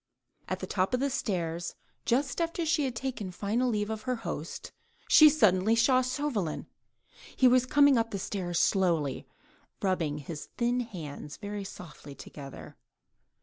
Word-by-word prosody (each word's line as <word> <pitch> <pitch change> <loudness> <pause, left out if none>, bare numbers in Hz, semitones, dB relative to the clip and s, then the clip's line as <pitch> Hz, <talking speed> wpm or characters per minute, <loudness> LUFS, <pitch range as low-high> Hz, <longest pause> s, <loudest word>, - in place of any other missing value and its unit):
At - - -3
the - - -2
top 190 +5 0
of - - -2
the 280 +1 0
stairs, 170 -6 -2 0.3
just 260 +4 +1
after 335 0 -1
she 310 -2 +2
had 255 -3 -3
taken 240 -5 -4
final 210 +7 -1
leave 210 -1 -1
of 220 -1 -4
her 250 - +2
host, 155 +3 -5 0.4
she 305 -1 +9
suddenly 215 -7 +3
saw 255 +3 +4
Chauvelin; 255 - -2 0.7
he 260 - +5
was 255 0 +4
coming 285 -2 +5
up 225 0 0
the 205 - -3
stairs 180 -3 -2
slowly, 170 -8 +1
and - - -33
rubbing 165 -6 0
his 150 +1 -7
thin 245 0 +1
hands 160 -11 -7
very 205 -1 -5
softly 155 -7 -10
together. 140 -1 -10
210 Hz, 155 wpm, -29 LUFS, 175-255 Hz, 0.7 s, she